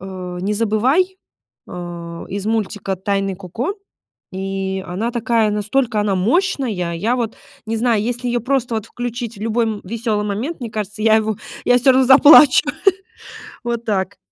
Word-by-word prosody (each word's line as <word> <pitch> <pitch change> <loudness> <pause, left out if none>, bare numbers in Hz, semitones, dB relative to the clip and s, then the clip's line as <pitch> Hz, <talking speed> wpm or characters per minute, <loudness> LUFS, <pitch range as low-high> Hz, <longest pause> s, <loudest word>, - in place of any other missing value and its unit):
э, 185 -2 -7
"Не 200 +3 -1
забывай", 255 - +1 0.5
э, - - -10 0.6
из 200 +1 -4
мультика 205 -3 -2
"Тайны 195 0 -1
Коко". 225 - -4 0.6
И 190 0 -3
она 195 +7 -3
такая 230 -2 +1
настолько 215 +2 0
она 205 -1 0
мощная. 265 - +1 0.2
Я 220 +9 0
вот 230 -3 -3 0.3
не 225 +1 -2
знаю, 230 -2 +2
если 245 +1 -3
её 240 0 0
просто 255 -1 -1
вот 220 0 -3
включить 240 -1 -5
в - - -11
любой, 230 +1 +1
м, 215 -2 -3
весёлый 220 0 -2
момент, 230 +12 -3
мне 240 -3 -5
кажется, 215 0 -5
я 220 0 +5
его 220 -1 0 0.3
я 245 - +5
всё 255 +2 +5
равно 260 0 +4
заплачу. 285 +1 +8 1.0
Вот 235 -1 -3
так. 200 -2 -1
220 Hz, 160 wpm, -19 LUFS, 200-245 Hz, 1.0 s, заплачу